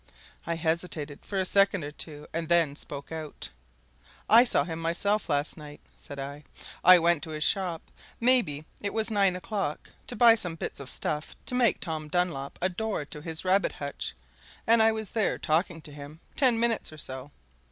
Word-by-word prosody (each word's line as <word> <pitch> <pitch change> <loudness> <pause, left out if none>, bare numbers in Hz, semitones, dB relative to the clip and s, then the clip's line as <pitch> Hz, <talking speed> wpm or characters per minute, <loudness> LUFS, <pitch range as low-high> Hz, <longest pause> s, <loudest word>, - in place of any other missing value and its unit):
I 170 - 0
hesitated 160 -3 -2
for 200 - -4
a 190 - +1
second 195 -2 +4
or 145 - -5
two, 150 -1 -7
and 165 0 -3
then 165 -4 +3
spoke 140 0 -7
out. 155 -2 -5 0.8
"I 230 +2 +8
saw - - +3
him 165 -2 -5
myself 180 +5 0
last 145 0 0
night," 150 -1 -10 0.2
said 140 - -9
I. 140 +2 -6 0.4
"I 180 +1 +10
went 170 -2 +3
to 160 - -6
his 155 -1 -2
shop 180 -3 +1 0.4
maybe 230 - +2 0.2
it 200 +1 -3
was 220 0 0
nine 195 -3 +3
o'clock 180 -4 -4 0.2
to - - -4
buy 230 +1 +7
some 180 -7 -2
bits - - -5
of 135 -2 -6
stuff 150 0 -2
to - - -4
make 250 -3 +3
Tom 155 -3 -4
Dunlop 150 -5 -1
a - - +5
door 200 -4 -3
to 150 +1 -8
his 160 +2 -2
rabbit 190 +2 +2
hutch, 140 - -5 0.5
and 230 0 +6
I 220 0 +6
was 220 -3 -3
there 220 -3 +1
talking 165 +1 0
to 150 - -9
him 145 +2 -10 0.2
ten 250 -5 +3
minutes 230 -5 +1
or 155 - -11
so. 130 -1 -4
170 Hz, 190 wpm, -28 LUFS, 150-200 Hz, 0.8 s, I